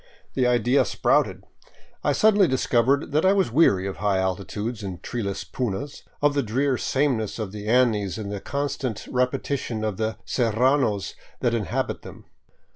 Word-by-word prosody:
The 130 -2 +2
idea 125 +2 +3
sprouted. - - +1 0.6
I - - +2
suddenly 210 -3 +4
discovered 130 +1 +1
that 150 +2 +2
I 190 +1 +5
was 190 - +1
weary 100 - +4
of 95 - -4
high 105 -2 +1
altitudes 100 +4 -3
and 95 -3 -6
treeless 100 -5 -3
punas, 130 +4 -4 0.2
of 145 0 +4
the 140 - +1
drear 130 +4 0
sameness 130 -5 0
of 110 -4 -4
the 105 0 -7
Andes 110 -5 +2
and 105 -2 -5
the 100 -1 -4
constant 140 -5 -3
repetition 125 -2 -1
of 105 -3 -2
the 110 0 -2
serranos 120 -2 +1 0.3
that 120 - +1
inhabit 110 -4 -2
them. - - -12
120 Hz, 155 wpm, -24 LUFS, 105-135 Hz, 0.6 s, I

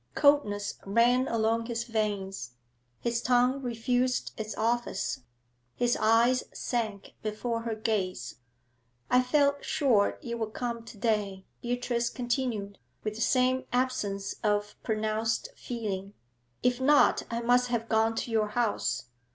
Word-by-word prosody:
Coldness 285 -9 +3
ran 240 +5 +3
along 230 0 +1
his 235 -1 -2
veins; 200 - -2 0.5
his 235 -1 0
tongue 250 +2 +3
refused 250 +1 0
its 215 0 -5
office; 230 - 0 0.6
his 245 0 +2
eyes 235 +3 +4
sank 220 -5 -3
before 230 +2 -2
her 230 -1 -3
gaze. 200 - -2 0.7
'I 250 - +6
felt 280 +2 +2
sure 260 -10 +2
you 235 -1 -5
would 220 -1 -3
come 235 -2 -3
to 225 - -11
day,' 205 -3 -1 0.2
Beatrice 240 -1 -1
continued, 240 -5 -2 0.2
with 215 - -2
the 225 - -6
same 255 +1 +2
absence 210 -6 -1
of 210 -1 +1
pronounced 220 0 -1
feeling. 205 -4 -4 0.5
'If 250 0 +2
not, 290 +2 +5
I 235 0 -2
must 245 +1 +3
have 235 -2 -1
gone 225 0 +2
to 235 - -3
your 220 -1 +2
house. 210 - 0
230 Hz, 130 wpm, -29 LUFS, 215-245 Hz, 0.7 s, I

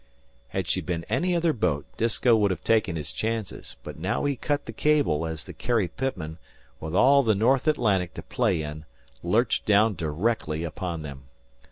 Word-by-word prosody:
Had - - -3
she - - 0
been 85 -2 -3
any 180 0 +1
other 170 -2 +2
boat 80 - 0
Disko 115 +1 +3
would 105 -2 +3
have 90 -4 -3
taken 110 -6 +2
his 75 -2 -3
chances, 110 -2 -4
but - - -8
now 95 - -1
he 140 -1 +1
cut 145 +4 -2
the 115 - -7
cable 135 - +2
as 80 -1 -5
the - - -9
Carrie 115 -6 0
Pitman, 90 -9 -4 0.4
with 80 +2 -5
all 140 +7 +6
the 110 -5 +2
North 125 +8 +2
Atlantic 100 - +1
to - - -7
play 105 -11 0
in, 75 +1 -7 0.4
lurched - - +1
down 105 +1 +5
directly 80 0 -1
upon 85 -1 -4
them. 70 -3 -9
100 Hz, 180 wpm, -26 LUFS, 80-120 Hz, 0.4 s, all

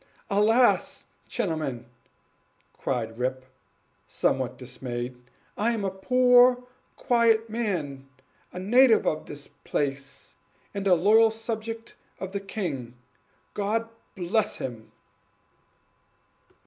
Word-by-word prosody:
"Alas! 220 +5 +3 0.2
gentlemen," 155 - -2 0.9
cried 115 -3 -3
Rip, 130 +1 -2 0.6
somewhat 130 -1 0
dismayed, 125 -1 -5 0.4
"I 230 +3 +1
am 215 -3 -2
a 190 - -1
poor 250 +4 +5 0.3
quiet 230 -2 +2
man, 155 - -3 0.4
a - - -9
native 225 +5 +5
of 155 - -1
the 145 0 -8
place, 135 -6 -3 0.4
and 200 -1 -2
a 185 - +6
loyal 215 +6 +5
subject 225 0 -5 0.3
of 190 0 -5
the 200 - -2
king, 155 - -5 0.6
God 215 +3 -1 0.3
bless 205 +4 0
him!" 115 -4 -7
195 Hz, 95 wpm, -26 LUFS, 135-225 Hz, 0.9 s, a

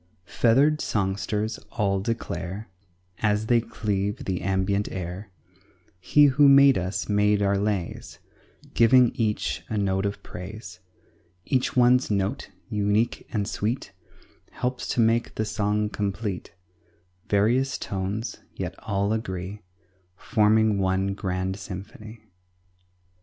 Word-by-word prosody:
Feathered 140 +9 +3
songsters 105 +2 -1
all 100 -3 0
declare 100 -2 -4 0.5
As 105 0 +1
they 120 0 +3
cleave 100 -2 -3
the 90 -2 -2
ambient 95 +2 0
air, 90 +2 -6 0.7
"He 145 +10 +5
who 140 +1 +5
made 140 -1 +7
us 90 +2 -2
made 105 0 +2
our 100 0 +2
lays, 100 -3 -3 0.6
Giving 120 +1 +5
each 105 - -1
a 110 - -2
note 95 -1 +1
of 100 - -6
praise; 95 0 -9 0.7
Each 130 -1 0
one's 125 +1 +4
note, 100 -2 -1 0.2
unique 105 +2 0
and 105 -3 -1
sweet, 110 +4 -3 0.6
Helps 125 0 -3
to - - -1
make 115 +1 +1
the 110 - -1
song 105 0 0
complete; 100 -1 -4 0.7
Various 120 +6 +2
tones, 100 +4 -4 0.2
yet - - -4
all 100 +1 -1
agree, 95 -2 -4 0.5
Forming 110 -2 +2
one 95 +1 +1
grand 95 -1 -3
symphony." 105 +4 -9
105 Hz, 115 wpm, -25 LUFS, 95-115 Hz, 0.7 s, made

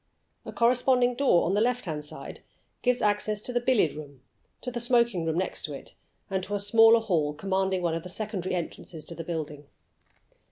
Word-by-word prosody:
A - - -5
corresponding 245 +1 +3
door 250 -8 +3
on 175 - 0
the 205 - +2
left 245 0 0
hand 150 -3 -6 0.4
gives 250 -1 +1
access 210 0 +1
to 250 - -3
the 245 - +2
billiard 240 - +2
room, 140 -4 -11 0.4
to 250 - -3
the 240 - -4
smoking 235 -7 +2
room 160 0 -1
next 185 0 -2
to 150 -3 -5
it, - - -11 0.3
and 190 -1 -2
to 205 +2 -3
a - - -1
smaller 225 +3 +6
hall 165 -9 0
commanding 190 +1 -1
one 170 -2 +1
of 165 - -2
the 180 - -9
secondary 195 -2 -3
entrances 165 -2 -6
to - - -7
the 165 - -6
building. 150 -3 -5
195 Hz, 195 wpm, -27 LUFS, 165-235 Hz, 0.4 s, smaller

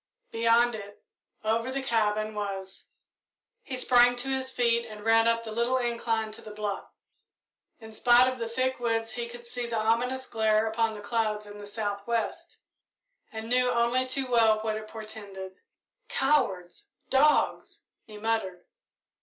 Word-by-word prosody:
Beyond 230 +1 +3
it, 205 -2 -9 0.4
over 230 +3 0
the 270 0 -3
cabin, 215 -3 0
was 195 -2 -5 0.7
He 260 - -5
sprang 245 -1 +5
to 245 +2 -2
his 265 -1 -1
feet 235 -2 +2
and 215 -2 -10
ran 225 0 +5
up 230 0 +2
the 220 - -7
little 235 +3 +1
incline 230 -3 -1
to 215 - -12
the - - -10
bluff. 210 -1 -4 0.9
In 220 -1 -11
spite 240 +3 +5
of 255 -1 -2
the 230 -1 -3
thick 255 +2 -1
woods 225 -1 -1
he 235 0 -4
could 240 0 -11
see 240 0 -4
the 235 -1 -2
ominous 240 +4 0
glare 220 -2 +2
upon 225 0 0
the 210 - -8
clouds 215 -1 -1
in 205 0 -11
the 205 - -9
south 205 -1 -4
west, 235 -1 -2 0.7
and 220 0 -6
knew 250 +1 +3
only 240 +2 +2
too 265 +1 -1
well 225 -3 +4
what 220 0 -1
it 215 0 -6
portended. 205 -4 -9 0.6
"Cowards! 270 - 0 0.2
Dogs!" 295 +3 +2 0.2
he 215 -1 -12
muttered. 210 -5 -2
225 Hz, 160 wpm, -28 LUFS, 215-245 Hz, 0.9 s, sprang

